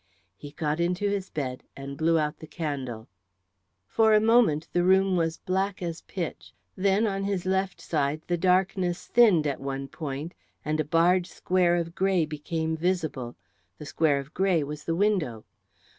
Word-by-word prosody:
He 145 - -10
got 150 +1 -2
into 180 +4 0
his 195 -2 -3
bed 130 -4 -4
and 140 0 -7
blew 165 +2 +2
out 150 -1 -1
the 160 - -10
candle. 135 -9 -5 0.8
For 220 - +3
a - - +6
moment 220 -9 +3
the 175 - +2
room 190 +1 +4
was 165 -1 0
black 190 +1 -1
as 170 -1 -4
pitch, 175 -4 -6 0.2
then 195 +3 +2
on 195 -2 -1
his 195 -3 -2
left 190 0 0
side 150 -1 -1
the 175 - 0
darkness 180 0 +1
thinned 210 -10 +5
at 140 -2 -2
one 135 0 -4
point 145 +3 -6 0.3
and 155 +1 -1
a - - +2
barred 175 +3 +3
square 180 -1 +1
of 170 -1 -2
grey 190 -3 +2
became 160 +2 -3
visible; 160 -8 -2 0.4
the 150 - -9
square 145 -1 +2
of 140 +3 -7
grey 185 -5 +2
was 150 +1 -7
the 165 - 0
window. 170 - 0
170 Hz, 170 wpm, -27 LUFS, 150-190 Hz, 0.8 s, a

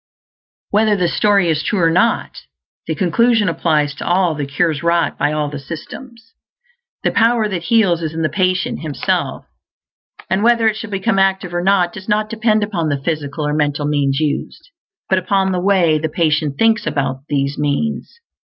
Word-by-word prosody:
Whether 215 0 +3
the 180 -2 +1
story 200 +1 +2
is 155 -2 +1
true 205 - -1
or 165 -1 +3
not, 225 +7 +1 0.5
the - - -2
conclusion 220 +3 +2
applies 155 -3 0
to 145 - -8
all 175 -1 +1
the 145 -2 -4
cures 145 +1 0
wrought 170 0 +1
by 145 +1 0
all 150 -1 -1
the 145 -1 -6
systems. 225 - -10 0.7
The - - +1
Power 230 -1 +2
that 180 -4 -4
Heals 195 -6 +2
is 160 -2 -3
in 165 - -2
the - - +3
patient 185 +4 -1
himself; 155 -3 -2 0.8
and 190 +2 0
whether 230 0 +3
it 220 - +1
shall 225 0 -7
become 195 0 0
active 190 -2 +1
or 175 - -1
not 185 -2 +2
does 195 0 -9
not 215 +1 +1
depend 220 -1 +1
upon 175 -7 -2
the 140 -1 -1
physical 150 0 -3
or 150 - -1
mental 145 -1 0
means 140 -2 0
used, 155 - -3 0.4
but 190 - +2
upon 190 +1 0
the 180 -1 -1
way 180 -5 +3
the 160 +1 -2
patient 150 -3 0
thinks 225 0 +2
about 135 -2 -1
these 140 -1 -1
means. 185 - -2
175 Hz, 180 wpm, -18 LUFS, 150-210 Hz, 0.8 s, Whether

